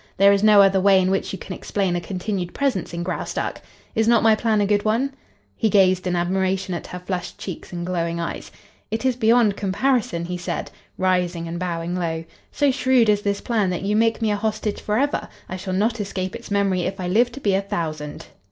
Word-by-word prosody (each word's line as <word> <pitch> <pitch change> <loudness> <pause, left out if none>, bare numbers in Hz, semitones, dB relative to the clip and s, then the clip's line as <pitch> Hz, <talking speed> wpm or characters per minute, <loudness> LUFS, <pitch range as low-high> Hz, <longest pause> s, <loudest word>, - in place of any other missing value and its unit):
There 200 +1 +6
is 200 - +2
no 210 -1 +7
other 195 0 +4
way 195 0 +6
in 185 0 +1
which 195 - -1
you 195 - -4
can 190 - -7
explain 190 -1 -1
a 175 - -1
continued 185 -1 -4
presence 265 -10 -1
in 170 0 -4
Graustark. 180 - -3 0.3
Is 225 -2 +1
not 235 -1 +4
my 225 -1 +6
plan 215 0 +1
a 205 - +3
good 205 0 +2
one?" 240 +6 +1 0.4
He 220 - +1
gazed 185 -2 +3
in 180 - 0
admiration 190 +1 0
at 170 - -5
her 180 - -6
flushed 180 0 -5
cheeks 185 -4 -7
and 175 -1 -4
glowing 170 -2 -2
eyes. 170 - -5 0.4
"It 225 +3 -3
is 260 -2 +2
beyond 225 -3 +3
comparison," 200 -3 0
he 180 +1 -4
said, 175 - -4 0.3
rising 180 -2 0
and 170 +1 -4
bowing 175 -1 -3
low. 165 -2 -2 0.3
"So 285 -2 +2
shrewd 255 -3 +3
is 205 -1 +3
this 200 -1 -1
plan 215 -5 0
that 180 +1 -3
you 205 +2 0
make 225 +1 +2
me 215 - +2
a - - +1
hostage 215 0 -2
forever; 255 +8 0 0.2
I - - -5
shall 185 0 -5
not 220 +4 +1
escape 190 -2 -4
its - - -9
memory 200 -2 +1
if 195 +3 -3
I 180 - -3
live 235 +7 +3
to 275 - -7
be 205 -7 +1
a 195 - +2
thousand." 160 -7 -4
195 Hz, 220 wpm, -22 LUFS, 180-215 Hz, 0.4 s, no